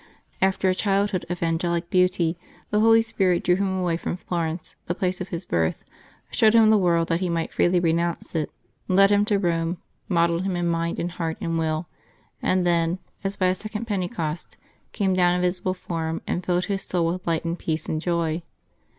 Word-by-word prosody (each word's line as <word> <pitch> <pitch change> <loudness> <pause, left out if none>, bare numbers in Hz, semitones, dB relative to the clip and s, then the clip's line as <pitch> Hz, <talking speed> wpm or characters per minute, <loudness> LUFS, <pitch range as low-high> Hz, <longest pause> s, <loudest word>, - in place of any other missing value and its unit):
After 190 0 +2
a 185 - +4
childhood 195 -1 0
of 175 -1 -3
angelic 170 +1 -1
beauty 180 -2 +2 0.4
the 210 - +3
Holy 225 +1 +6
•Spirit 185 -5 +1
drew 180 0 +3
him 190 -1 0
away 175 -3 0
from 175 - -4
Florence, 170 -2 -3
the 175 - -1
place 185 0 -1
of 185 - -4
his 175 -1 -5
birth, 80 -1 0 0.5
showed 220 0 +4
him 220 -1 +7
the 215 - +6
world, 170 -3 +2
that 165 - +1
he 185 -1 -1
might 165 -1 -2
freely 175 0 +3
renounce 170 0 0
it, 155 -3 -1 0.4
led 195 +2 +5
him 205 0 +4
to 210 -2 +2
Rome, 170 -2 0 0.3
modelled 170 -1 +2
him 190 -1 -1
in 175 0 -1
mind 170 0 -1
and 175 - -2
heart 165 0 -3
and 165 -5 -1
will, 160 +1 -1 0.5
and 185 -1 +1
then, 170 0 +2 0.3
as 195 0 -2
by 185 - 0
a 185 - +4
second 215 +3 -5
Pentecost, 180 -6 -3 0.3
came 195 -3 0
down 180 -1 +3
in 180 - 0
visible 180 +1 0
form 165 -2 -4
and 180 - -2
filled 180 0 +1
his 195 -2 -2
soul 175 -2 0
with 175 +2 -2
light 165 0 0
and 170 +1 -2
peace 160 -1 -2
and 155 - -2
joy. 170 -1 0
175 Hz, 200 wpm, -24 LUFS, 165-190 Hz, 0.5 s, him